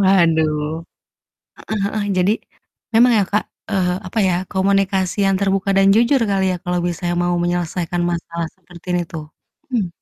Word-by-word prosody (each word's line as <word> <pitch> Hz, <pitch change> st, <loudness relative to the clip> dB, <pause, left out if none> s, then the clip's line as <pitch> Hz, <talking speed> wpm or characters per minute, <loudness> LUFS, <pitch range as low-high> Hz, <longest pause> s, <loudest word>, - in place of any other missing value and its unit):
Waduh. 160 Hz, -4 st, +2 dB, 0.9 s
Heeh 215 Hz, -2 st, -1 dB
heeh. 205 Hz, +1 st, -1 dB
Jadi 185 Hz, +3 st, +3 dB, 0.6 s
memang 240 Hz, +2 st, +6 dB
ya, -, -, +2 dB
Kak, 210 Hz, +1 st, +1 dB, 0.3 s
eee, 180 Hz, -3 st, +1 dB
apa 185 Hz, -, -4 dB
ya, 180 Hz, -, +2 dB, 0.2 s
komunikasi 195 Hz, -1 st, +1 dB
yang 195 Hz, -, +2 dB
terbuka 195 Hz, 0 st, +1 dB
dan 195 Hz, 0 st, +5 dB
jujur 240 Hz, +4 st, +4 dB
kali 195 Hz, -1 st, +1 dB
ya, -, -, -2 dB
kalau 180 Hz, 0 st, 0 dB
misalnya 175 Hz, 0 st, -2 dB
mau 175 Hz, 0 st, +1 dB
menyelesaikan 175 Hz, 0 st, -1 dB
masalah 170 Hz, 0 st, -3 dB
seperti 180 Hz, -1 st, -5 dB
itu. 165 Hz, -1 st, -7 dB, 0.5 s
Mmm. 215 Hz, -7 st, +1 dB
185 Hz, 150 wpm, -19 LUFS, 175-195 Hz, 0.9 s, memang